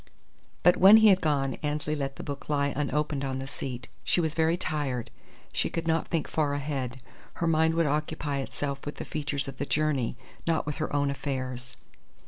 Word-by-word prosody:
But 180 - +6
when 195 +4 +9
he 220 -1 +7
had 190 -1 +5
gone 140 -3 0
Annesley 150 0 -1
let 135 -2 -3
the - - -7
book 140 0 -6
lie 140 -1 +1
unopened 150 0 0
on 135 -1 -2
the 135 - -4
seat. 125 -2 -6 0.2
She - - +2
was 160 -3 0
very 160 +1 +2
tired. 145 -8 -2 0.4
She - - +1
could 165 0 -3
not 165 0 +1
think 165 -3 -1
far 145 -2 0
ahead. 135 -3 -3 0.3
Her 170 - -2
mind 160 0 +3
would 165 0 +3
occupy 150 -1 -1
itself 140 0 -4
with 145 - -5
the - - -6
features 145 -1 -3
of 135 -1 -7
the 140 - -2
journey, 140 -6 0 0.3
not 165 -1 +2
with 150 -1 -3
her 155 - -2
own 145 -1 +1
affairs. 130 -2 -4
145 Hz, 195 wpm, -28 LUFS, 135-155 Hz, 0.4 s, when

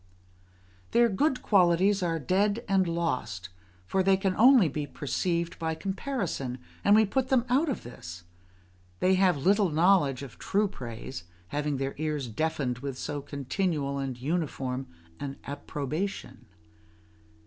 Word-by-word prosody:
Their 235 0 +5
good 265 +6 +1
qualities 190 +1 +4
are 170 -2 0
dead 200 - +1
and 190 -2 +3
lost; 165 - -2 0.4
for 190 - +1
they 190 0 +4
can 190 -1 0
only 245 -5 +7
be 150 0 -3
perceived 170 +5 -2
by 160 -1 -1
comparison, 190 - -3 0.3
and 205 - +6
we 220 0 +6
put 260 +5 0
them 255 -3 +2
out 285 +6 +3
of 265 - -3
this: 85 -7 -9 0.8
they 185 - +3
have 185 -4 +3
little 200 0 +4
knowledge 155 -5 +3
of 125 -5 -11
true 205 +1 +1
praise, 120 - -7 0.2
having 145 +2 -1
their 135 +1 -2
ears 150 -4 -2
deafened 125 0 -1
with 135 -1 -5
so 145 +1 -4
continual 140 +1 -2
and 130 -3 -4
uniform 135 -3 -2 0.3
an 140 -1 -5
approbation. 140 - -4
165 Hz, 135 wpm, -28 LUFS, 135-195 Hz, 0.8 s, only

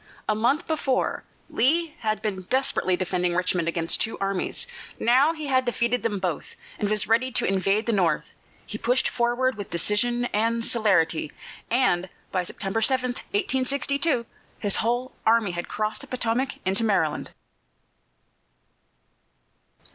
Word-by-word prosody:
A 215 - +3
month 245 +10 +1
before, 285 -5 -1 0.2
Lee 320 +6 +2
had 215 -2 -1
been 200 -3 -2
desperately 260 -8 +2
defending 180 -1 0
Richmond 180 -2 0
against 165 0 0
two 225 - 0
armies; 195 -1 -1 0.3
now 260 +6 +4
he 310 -2 -6
had 260 -2 +2
defeated 240 0 0
them 215 -3 -1
both 180 -5 -3 0.2
and 205 - 0
was 215 0 +1
ready 235 +4 +2
to - - +1
invade 195 +3 +1
the 235 - +1
North. 190 -6 +1 0.3
He - - -6
pushed 250 +2 +2
forward 240 +2 +1
with 205 - -6
decision 240 +7 +1
and 230 +2 +1
celerity, 175 -9 +2 0.4
and 190 -7 +2 0.2
by 185 -1 0
September 195 +4 -3
7, 255 +1 +2
1862, 265 +3 0 0.3
his 205 -2 0
whole 245 +3 0
army 225 -3 +3
had 175 0 -4
crossed 215 0 -2
the 280 - -6
Potomac 255 +1 -1
into 195 +4 +1
Maryland. 185 -9 +1
225 Hz, 140 wpm, -25 LUFS, 195-255 Hz, 0.4 s, now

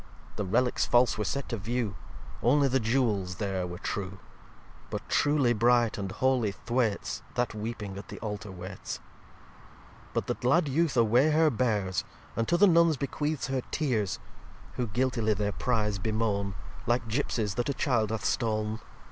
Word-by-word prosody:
The - - -2
Relicks 125 +6 +2
false 120 0 +4
were 110 - -1
set 140 +6 -2
to 115 - -2
view; 110 0 -2 0.5
Only 140 +4 +4
the 135 0 +2
Jewels 110 -6 +1
there 95 -3 -2
were 90 0 -6
true. 95 0 -4 0.7
But - - -5
truly 145 -5 +3
bright 120 0 +3
and 100 -1 -3
holy 120 -1 +1
Thwaites 120 0 -1
That 120 -1 0
weeping 105 -2 -5
at - - -10
the - - -8
Altar 105 -2 -5
waites. 95 +1 -6
xxxiv - - -21 1.2
But - - 0
the - - 0
glad 150 +7 +2
Youth 150 0 +1
away 120 +6 +5
her 155 0 +4
bears, 105 -6 0 0.3
And 115 - 0
to 175 - +3
the 205 - +7
Nuns 170 -4 +5
bequeaths 145 +2 -2
her 135 -1 0
Tears: 115 -11 0 0.6
Who 125 - -2
guiltily 115 -1 +1
their 105 +1 0
Prize 105 -4 0
bemoan, 100 -2 -1 0.3
Like 120 0 +1
Gipsies 110 -4 -1
that 120 +6 -1
a - - +1
Child 120 -6 +1
hath 110 -1 -3
stoln. 110 -1 0
115 Hz, 165 wpm, -29 LUFS, 105-130 Hz, 1.2 s, the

